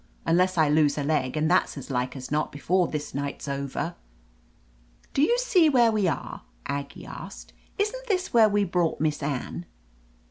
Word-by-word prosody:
— - - -33
unless 180 +2 +2
I 160 -2 +5
lose 150 -1 +3
a 145 - -1
leg, 145 -2 0
and 155 +1 +2
that's - - +2
as 140 - -7
like 125 0 -1
as 130 0 -8
not 150 +1 0
before 175 +5 +1
this 150 -1 -5
night's 140 +1 -4
over." 140 +4 -3 1.2
"Do 275 - +1
you 470 +11 +4
see 370 -10 +4
where 240 -5 +4
we 210 -3 +1
are?" 150 -6 -3 0.2
Aggie 140 0 -5
asked. - - -10 0.2
"Isn't - - -2
this 375 -4 -1
where 225 -2 +6
we 205 0 +2
brought 175 -3 0
Miss 150 0 0
Anne 145 +4 -4
160 Hz, 180 wpm, -26 LUFS, 140-215 Hz, 1.2 s, where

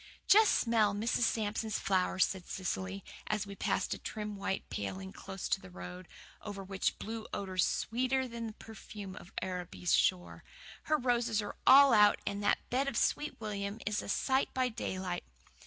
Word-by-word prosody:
"Just 430 +1 +6
smell 220 -4 +3
Mrs. 220 +4 0
Sampson's 215 0 -1
flowers," 185 -1 +2
said 190 -2 -6
Cecily, 190 +1 -3 0.2
as 215 -1 0
we 200 - -8
passed - - 0
a - - -6
trim 210 -2 -5
white 195 -1 -3
paling 95 -2 -4
close 190 -1 -6
to 195 - +1
the 190 - -11
road, 180 0 -9 0.3
over 200 -2 -6
which 190 0 -1
blew 220 0 -6
odours 185 -2 0
sweeter 255 +3 0
than 230 -1 -5
the 220 - -7
perfume 210 -3 -9
of 175 - -12
Araby's 180 -1 -2
shore. 180 -1 +1 0.4
"Her 305 - +3
roses 240 -4 +1
are 205 - -4
all 275 -1 +9
out 210 -1 +6
and 200 0 -2
that 205 - +1
bed 265 +3 +1
of 275 - -1
Sweet 295 0 0
William 205 -1 -4
is 210 0 0
a - - -8
sight 265 +6 +1
by 255 -1 +2
daylight." 185 -6 -3
205 Hz, 170 wpm, -33 LUFS, 190-230 Hz, 0.4 s, all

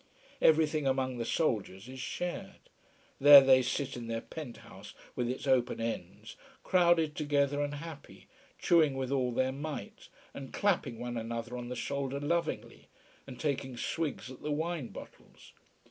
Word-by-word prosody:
Everything 155 -2 +4
among 130 -2 0
the 115 - -2
soldiers 110 - -1
is 130 0 -9
shared. 175 +6 -5 0.5
There 145 +1 +11
they 130 -1 +6
sit 130 +2 -2
in 120 -2 -6
their 115 0 -3
pent 145 -4 -8
house - - -12 0.2
with 120 -1 -1
its 130 - -4
open 130 -4 +2
ends, 115 -6 -5 0.3
crowded 170 -4 +3
together 145 -1 +1
and 145 0 -2
happy, 155 0 -10 0.3
chewing 160 -5 +3
with 135 -1 -3
all 130 -3 +1
their 130 +2 +1
might 145 +2 -7 0.2
and 135 -1 -8
clapping 185 - 0
one 120 0 -4
another 115 +1 -4
on 120 -1 -6
the 125 - -4
shoulder 140 0 -3
lovingly, 170 +3 -2 0.4
and 130 -2 -9
taking 135 -4 -2
swigs 150 -1 -3
at 130 - -12
the 150 - -4
wine 160 -2 -2
bottles. - - -13
135 Hz, 155 wpm, -31 LUFS, 125-150 Hz, 0.5 s, There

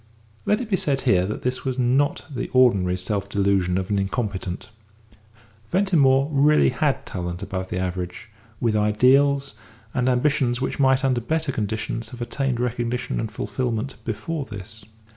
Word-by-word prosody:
Let 210 - +3
it 250 - -4
be 195 -3 +1
said 140 -5 0
here 95 -8 +3
that 105 - -5
this 130 0 -2
was 130 -1 -2
not 130 +3 +1
the 125 - -3
ordinary 100 -8 +4
self 100 +1 -3
delusion 95 -3 +1
of 95 +2 -3
an 100 - +2
incompetent. 100 -2 -3 1.0
Ventimore 145 -9 +3
really 150 +1 +4
had 145 -3 0
talent 90 0 -5
above 95 -1 -4
the - - -3
average, 90 +2 -4 0.3
with 115 -3 +1
ideals 135 +6 +3 0.4
and 125 -1 +1
ambitions 130 -1 +1
which 130 - -3
might 135 0 +3
under 130 -2 +1
better 155 +3 -1
conditions 110 0 -3
have 125 - -10
attained 130 0 -1
recognition 120 0 -2
and 110 - -2
fulfilment 115 +4 -3
before 145 +8 -3
this. 105 0 -9
120 Hz, 155 wpm, -23 LUFS, 100-135 Hz, 1.0 s, ordinary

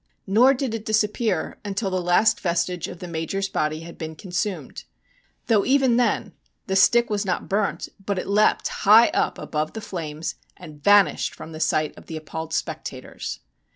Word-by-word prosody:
Nor 240 +8 +5
did 255 -3 -2
it 225 -2 -4
disappear 215 -3 0
until 200 0 -2
the 185 -1 0
last 210 +5 +3
vestige 175 -1 -1
of - - -8
the 180 - -8
Major's 170 +4 -2
body 155 -3 -1
had 170 +1 -11
been 160 -1 -5
consumed. 185 +3 -4 0.6
Though 215 -4 +3
even 265 -3 +3
then 240 -3 +1 0.3
the 190 - -2
stick 235 +5 +5
was 205 -1 0
not 185 -3 -2
burnt, 200 +1 -1 0.2
but 200 0 -2
it - - -2
leapt 210 +2 +2
high 220 +3 +7
up - - 0
above 155 0 -3
the - - -5
flames 160 -5 -5 0.2
and 155 -5 -12
vanished 205 -1 +4
from 160 - -10
the 155 - -8
sight 155 -1 0
of - - -18
the 160 - -5
appalled 160 +1 -6
spectators. 155 -6 -5
190 Hz, 175 wpm, -24 LUFS, 160-215 Hz, 0.6 s, high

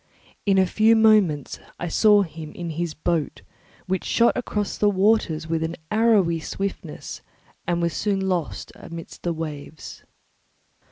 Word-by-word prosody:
In 195 -1 +4
a 190 - +5
few 220 +4 +4
moments 210 -10 +3 0.2
I 175 - -4
saw 205 +4 +5
him 160 -3 -8
in 170 -2 -5
his 165 0 -3
boat, 165 -1 -2 0.4
which 190 0 -1
shot 235 0 +3
across 210 -4 -2
the 210 - +3
waters 190 -5 +2
with 160 0 -1
an 160 +1 -2 0.2
arrowy 210 -7 +3
swiftness 180 -2 -5 0.5
and 170 0 0
was 170 -1 0
soon 195 -2 -1
lost 175 -5 -2
amidst 165 0 -10
the 175 - -1
waves. 155 -2 -7
175 Hz, 145 wpm, -24 LUFS, 160-205 Hz, 0.5 s, a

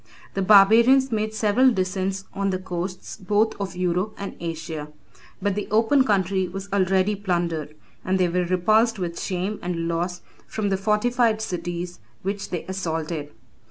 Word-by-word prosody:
The 195 - -1
barbarians 225 +7 +6
made 215 -1 0
several 220 +4 +3
descents 190 -1 -2
on 195 0 -1
the 185 - 0
coasts 180 0 -5
both 210 +3 +1
of 195 -2 -4
Europe 180 +3 -1
and 200 - -6
Asia; 160 -2 -5 0.5
but 200 0 0
the 205 +1 -3
open 230 +6 +4
country 190 -3 +1
was 195 +2 -7
already 190 +1 +2
plundered, 170 -6 -2 0.3
and 185 +1 +1
they 180 - +3
were 180 +1 0
repulsed 215 +6 +3
with 175 -3 -4
shame 190 +3 -2
and 170 -1 -2
loss 175 +2 -2 0.3
from 210 -2 -2
the 195 - +1
fortified 220 +3 +2
cities 175 -3 -4 0.2
which 195 +1 -3
they 175 - -4
assaulted. 160 -5 -3
190 Hz, 155 wpm, -24 LUFS, 175-210 Hz, 0.5 s, barbarians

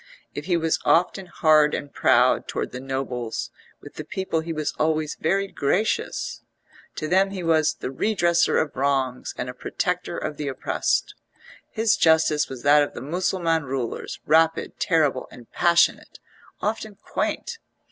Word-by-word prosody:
If - - -6
he 175 -2 +2
was 165 -1 0
often 180 +2 +2
hard 155 -3 +4
and 145 - -6
proud 125 0 +3
towards - - -3
the 125 - -6
nobles, 125 -3 -4 0.3
with 145 - -13
the 155 - -4
people 175 +1 -2
he 165 +1 -5
was 155 -2 -2
always 155 -1 +1
very 195 +5 0
gracious; 195 +6 -1 0.5
to 155 - -3
them 190 +4 +3
he 190 -2 -5
was 160 -2 +2
the - - -5
redressor 170 +1 +2
of 155 - -2
wrongs 135 -2 -1
and 125 - -3
a 125 - -5
protector 180 +6 -3
of 150 - -4
the 150 - -4
oppressed; 135 - -1 0.6
his 220 0 +2
justice 160 -2 +3
was 130 -2 -8
that 145 +1 +6
of 145 - -2
the - - -6
Mussulman 165 +1 0
rulers, 130 -3 -4
rapid, 160 +1 +2
terrible 150 -7 +1
and 120 -2 -15
passionate, 170 0 +2 0.4
often 215 -1 -3
quaint. 455 - -3
155 Hz, 155 wpm, -24 LUFS, 135-175 Hz, 0.6 s, that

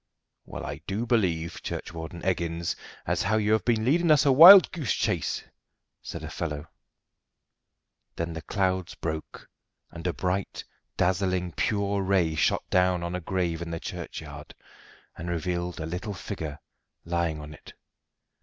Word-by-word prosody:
"Well, - - -7
I - - -6
do 105 +5 -2
believe, 90 -9 0
Churchwarden 80 +1 -6
Eggins, 85 -2 -1 0.3
as - - 0
how 110 +3 +1
you 105 0 +1
have 110 - +3
been 115 -2 +1
leading 170 +6 +3
us 150 -1 +5
a 140 - +5
wild 180 +8 +10
goose 155 - -1
chase!" - - -1 0.6
said - - -7
a - - -5
fellow. 75 -3 -4 1.5
Then 85 0 -3
the 80 - -6
clouds 95 0 -1
broke, 80 -1 -6 0.4
and 85 +1 -5
a 90 - 0
bright, 90 +4 -2 0.3
dazzling 90 0 +1
pure 100 +2 0
ray 95 -4 +2
shot 80 - +1
down 90 -1 +3
on 85 0 -3
a 90 - -3
grave 85 -2 -2
in 85 - -5
the 85 0 -4
churchyard, - - -8 0.6
and 85 +2 -5
revealed 85 +1 -2
a 80 - -3
little 90 +5 -4
figure 80 -6 -6 0.5
lying 85 -2 -1
on 75 0 -9
it. - - -14
90 Hz, 150 wpm, -27 LUFS, 85-100 Hz, 1.5 s, wild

